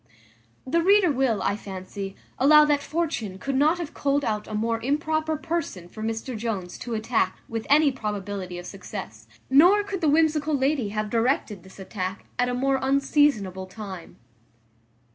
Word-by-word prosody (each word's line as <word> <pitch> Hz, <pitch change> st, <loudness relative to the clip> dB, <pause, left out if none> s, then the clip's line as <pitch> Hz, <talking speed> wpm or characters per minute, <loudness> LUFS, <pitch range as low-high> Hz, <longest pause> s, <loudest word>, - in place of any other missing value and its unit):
The 335 Hz, +6 st, +1 dB
reader 385 Hz, -1 st, +5 dB
will, 260 Hz, -6 st, +1 dB
I 200 Hz, -, +1 dB
fancy, 195 Hz, -1 st, -7 dB, 0.2 s
allow 300 Hz, +3 st, +7 dB
that 295 Hz, -1 st, +2 dB
Fortune 290 Hz, -, -3 dB
could 275 Hz, +8 st, -3 dB
not 305 Hz, +5 st, +3 dB
have 340 Hz, -4 st, -6 dB
culled 285 Hz, 0 st, 0 dB
out 210 Hz, -1 st, -2 dB
a 215 Hz, -, -5 dB
more 230 Hz, +1 st, -1 dB
improper 310 Hz, +4 st, 0 dB
person 295 Hz, -, -4 dB
for 215 Hz, -, -10 dB
Mr 225 Hz, +3 st, -3 dB
Jones 210 Hz, -5 st, -4 dB
to 240 Hz, -2 st, -4 dB
attack 220 Hz, -4 st, 0 dB
with 225 Hz, -1 st, -5 dB
any 290 Hz, 0 st, +5 dB
probability 205 Hz, -6 st, -4 dB
of 175 Hz, -, -8 dB
success; 180 Hz, -, -8 dB, 0.2 s
nor 355 Hz, +10 st, +6 dB
could 400 Hz, -2 st, -5 dB
the 315 Hz, -, +3 dB
whimsical 310 Hz, -1 st, +2 dB
lady 265 Hz, -4 st, +1 dB
have 210 Hz, 0 st, -3 dB
directed 230 Hz, -4 st, 0 dB
this 190 Hz, +2 st, -16 dB
attack 190 Hz, -1 st, -5 dB
at 245 Hz, 0 st, +2 dB
a 245 Hz, -, -1 dB
more 270 Hz, +1 st, +1 dB
unseasonable 265 Hz, -9 st, +1 dB
time. 190 Hz, -3 st, -9 dB
240 Hz, 160 wpm, -25 LUFS, 200-295 Hz, 0.2 s, allow